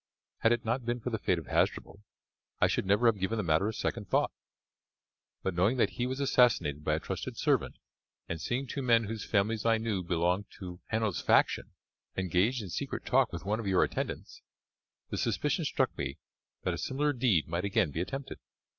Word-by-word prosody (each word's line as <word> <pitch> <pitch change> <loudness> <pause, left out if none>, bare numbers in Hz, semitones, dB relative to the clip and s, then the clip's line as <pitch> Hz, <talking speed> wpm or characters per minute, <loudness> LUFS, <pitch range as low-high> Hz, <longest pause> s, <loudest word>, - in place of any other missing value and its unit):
Had 115 - +4
it 120 0 +1
not 120 +3 0
been 120 +1 -1
for 125 +2 -4
the 110 - -1
fate 90 - +1
of 80 - -6
Hasdrubal 100 - 0 0.6
I - - +5
should - - 0
never 105 +5 +3
have 115 -3 +4
given 95 +5 -1
the 105 - 0
matter 80 +4 +2
a - - 0
second 105 -2 -3
thought; - - +2 1.1
but, 95 - -1
knowing 95 +9 +2
that 120 - +3
he 125 - -2
was 130 +2 -3
assassinated 115 - +3
by 75 0 +2
a - - -1
trusted - - -5
servant, - - +1 0.5
and 85 -2 -4
seeing 130 - -1
two 135 +2 -4
men 115 -3 +4
whose 110 0 -4
families 105 +1 +1
I 115 -1 +4
knew 110 -4 -1
belonged 90 +3 0
to 90 -2 -8
Hanno's 110 -4 0
faction - - +2 0.4
engaged 95 +6 +1
in 95 - -7
secret - - -4
talk - - +3
with - - -6
one 105 +3 0
of 110 - -4
your 95 -2 +4
attendants, - - -4 0.7
the - - -2
suspicion - - 0
struck - - 0
me 70 -1 -4 0.5
that 90 - 0
a 85 - -4
similar 145 - 0
deed 115 - +2
might 85 +2 -2
again 95 -6 +1
be 80 - -2
attempted. 135 +8 -5
105 Hz, 200 wpm, -30 LUFS, 90-120 Hz, 1.1 s, I